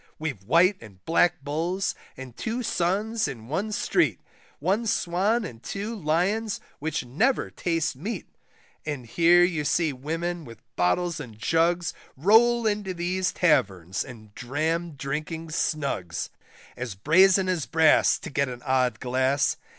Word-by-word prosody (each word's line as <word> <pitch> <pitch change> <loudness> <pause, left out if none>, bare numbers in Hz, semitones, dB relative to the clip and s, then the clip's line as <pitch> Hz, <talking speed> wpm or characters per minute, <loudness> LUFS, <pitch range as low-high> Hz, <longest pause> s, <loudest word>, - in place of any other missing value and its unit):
We've 145 -11 -4
White 175 - +4
and 100 -5 -15
Black 165 -2 +2
Bulls 170 +7 -1 0.2
and 130 -2 -9
two 235 +2 -3
Suns 210 +3 0
in 115 -5 -7
one 195 +8 -2
street, - - +1 0.4
One 210 +5 0
Swan 205 +5 +1
and 115 - -9
two 205 - -4
Lions 195 +5 0 0.2
which 155 -3 -2
never 220 - +1
taste 165 -3 -1
meat, 190 - -5 0.6
And 145 -5 -4
here 170 +8 +5
you 170 -4 +1
see 160 0 +1
women 165 +6 -3
with 115 -5 -11 0.2
bottles 160 - +1
and 115 -7 -9
jugs, 165 +7 +1 0.2
Roll 225 - +5
into 205 -3 -1
these 180 +2 -1
taverns 95 - +1
and 110 -5 -12
dram 160 +8 -2
drinking 155 +4 -4
snugs, 140 - -2 0.4
As 120 -5 -5
brazen 185 - +4
as 180 -6 -1
brass 160 -1 +4
to - - -9
get 140 -1 0
an 120 -1 -8
odd 130 -2 +1
glass. 130 +2 +1
160 Hz, 140 wpm, -26 LUFS, 130-185 Hz, 0.6 s, here